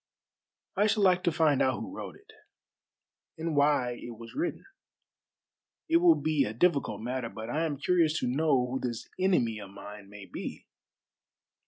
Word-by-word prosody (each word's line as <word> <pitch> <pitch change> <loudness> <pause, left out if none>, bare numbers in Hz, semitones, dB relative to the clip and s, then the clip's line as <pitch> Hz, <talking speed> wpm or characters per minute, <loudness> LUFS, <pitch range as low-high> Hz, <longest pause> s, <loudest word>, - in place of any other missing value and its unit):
"I 205 +2 +3
should 215 -1 +2
like 185 -1 +4
to 170 - +3
find 155 -4 +3
out 130 -1 +2
who - - -7
wrote - - -7
it, - - -19 1.1
and 160 -1 -2
why 140 -4 +2
it 120 -2 -8
was 115 0 -11
written. 335 +3 -3 1.2
It 330 - +4
will 340 -1 +6
be 155 -3 +1
a 105 - -3
difficult 140 - +1
matter, 125 0 -3
but 110 +1 -7
I 160 +4 0
am 145 -3 -4
curious 165 +1 +2
to 125 - 0
know 135 -1 +2
who 130 +2 -3
this 120 -3 -4
enemy 120 - +2
of 100 -2 -9
mine 100 0 -11
may 105 -1 -10
be." - - -7
140 Hz, 170 wpm, -29 LUFS, 115-170 Hz, 1.2 s, will